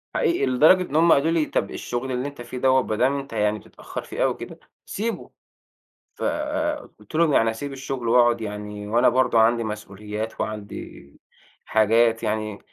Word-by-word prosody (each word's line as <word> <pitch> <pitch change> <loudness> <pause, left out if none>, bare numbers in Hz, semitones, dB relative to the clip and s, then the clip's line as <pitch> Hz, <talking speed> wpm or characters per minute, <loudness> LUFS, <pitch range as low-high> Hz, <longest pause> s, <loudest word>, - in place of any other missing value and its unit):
حقيقي، 355 -8 +1
لدرجة 155 +9 +5
إن 145 - -5
هُم 165 +1 +5
قالوا 155 +4 +2
لي: 165 -2 +2
"طَب - - -2
الشغل 125 +2 -4
اللي 125 +2 -2
أنتَ 140 -4 -9
فيه 120 +1 -7
دوَّة، 130 +1 +3
هو - - 0
ما 110 - -2
دام 130 +5 +2
أنتَ 135 -3 -9
يعني 105 -1 0
بتتأخَّر - - -8
فيه - - -3
أوي - - +2
كده، - - -10 0.3
سيبه." 225 +3 -4 0.8
ف - - -11 0.8
قُلت - - -17
لهُم: 160 -1 +3
"يعني 115 -4 +4
أسيب 135 +5 -6
الشغل 130 -3 -4
وأقعد؟" 120 0 +4
يعني 105 -1 -6
وأنا 120 +4 +4
برضو 125 -1 +3
عندي 115 +1 +3
مسؤوليَّات 105 +1 -6
وعندي 100 -9 -6 0.5
حاجات 115 +1 +3
يعني. 110 -1 -2
120 Hz, 175 wpm, -23 LUFS, 110-135 Hz, 0.8 s, لدرجة